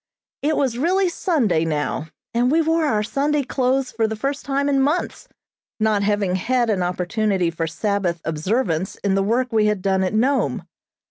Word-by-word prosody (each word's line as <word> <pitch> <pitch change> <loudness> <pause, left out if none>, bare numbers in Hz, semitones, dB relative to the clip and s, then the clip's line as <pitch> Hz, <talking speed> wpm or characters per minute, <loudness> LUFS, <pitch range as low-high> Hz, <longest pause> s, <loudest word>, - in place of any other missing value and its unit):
It 300 +2 +1
was 250 -4 0
really 370 +5 +2
Sunday 275 - +1
now, 155 -1 -2 0.3
and 240 +1 +2
we 315 +4 +3
wore 325 0 +2
our 215 -6 +1
Sunday 285 +5 0
clothes 260 0 0
for 225 -1 0
the 220 - -3
first 275 +5 -3
time 280 0 0
in 275 -1 +2
months, 295 +6 -1 0.5
not 215 -2 +2
having 205 -2 +1
had 240 +3 +1
an 195 -3 0
opportunity 180 +1 0
for 165 0 -3
Sabbath 195 -1 -1
observance 175 +2 -1
in 200 -1 +2
the 195 - +2
work 240 +5 0
we 215 -1 +3
had 210 -3 -1
done 190 -1 +2
at 185 +3 -1
Nome. 265 +5 +1
220 Hz, 180 wpm, -21 LUFS, 190-275 Hz, 0.5 s, we